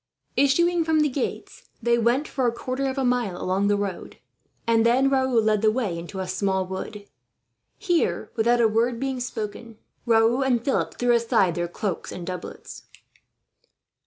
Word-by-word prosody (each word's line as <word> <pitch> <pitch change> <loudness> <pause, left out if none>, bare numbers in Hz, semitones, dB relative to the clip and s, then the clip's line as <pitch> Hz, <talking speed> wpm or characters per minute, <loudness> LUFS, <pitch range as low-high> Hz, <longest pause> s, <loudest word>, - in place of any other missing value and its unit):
Issuing 340 +5 +3
from 315 -1 +2
the 300 - +2
gates, 265 0 -5
they 235 0 +2
went 240 +6 +1
for 260 -3 -1
a - - +2
quarter 255 +3 -3
of 265 +1 -3
a 270 - 0
mile 245 -7 0
along 190 +2 0
the 205 0 +2
road, 200 -3 -5 0.5
and 230 -1 +3
then 255 +4 +3
Raoul 260 -3 +2
led 215 -1 +2
the 220 - +4
way 215 -7 -1
into 170 +3 -7
a 190 - -3
small 190 -1 0
wood. 200 +2 -6 0.7
Here, 350 -6 0
without 235 +2 +2
a 230 - +5
word 230 +2 0
being 265 -1 -2
spoken, 230 -1 -6 0.3
Raoul 230 +2 +4
and 245 -3 +1
Philip 275 - 0
threw 245 0 +1
aside 230 -6 +2
their 175 0 -2
cloaks 180 +1 -4
and 175 - -7
doublets. 180 0 -8
235 Hz, 170 wpm, -24 LUFS, 205-260 Hz, 0.7 s, a